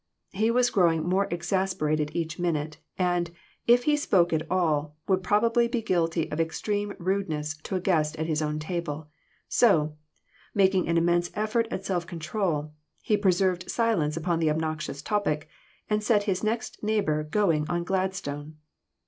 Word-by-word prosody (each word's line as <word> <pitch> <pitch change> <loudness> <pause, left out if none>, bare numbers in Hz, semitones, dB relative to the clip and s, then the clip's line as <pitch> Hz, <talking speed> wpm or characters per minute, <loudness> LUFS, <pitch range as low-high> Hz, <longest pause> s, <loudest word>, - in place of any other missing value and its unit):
He 215 +3 +1
was 245 +1 +3
growing 165 -5 +3
more 190 +2 +2
exasperated 175 -4 0
each 160 -1 -3
minute, 155 -3 -1 0.2
and, 175 -2 +1 0.4
if 240 +1 +6
he 300 +2 +3
spoke 180 - +2
at 160 0 -1
all, 155 -5 0
would 190 -1 +2
probably 230 +5 +3
be 235 -1 -2
guilty 165 -4 +1
of 150 - -3
extreme 205 +5 -1
rude 190 +1 -1
ness 150 0 -3
to 170 +5 -5
a - - +1
guest 160 -5 +1
at 160 - -2
his 160 -1 0
own 150 0 -1
table; 155 -2 -4 0.4
so, 155 -10 +3 0.6
making 190 -2 +3
an 170 0 +2
immense 175 +1 +2
effort 215 +2 0
at 190 -3 -4
self 175 -3 -1
control, 160 -3 -2 0.3
he 215 - +2
preserved 185 -2 +1
silence 190 -11 +1
upon 165 0 0
the 160 -2 +2
obnoxious 155 -2 -2
topic, 160 -8 0 0.4
and 210 0 0
set 210 -1 +3
his 195 -2 -1
next 225 +2 -2
neighbor 210 -8 +1
going 155 -2 +1
on 175 -1 0
Gladstone. 170 -6 -3
175 Hz, 160 wpm, -27 LUFS, 155-200 Hz, 0.6 s, if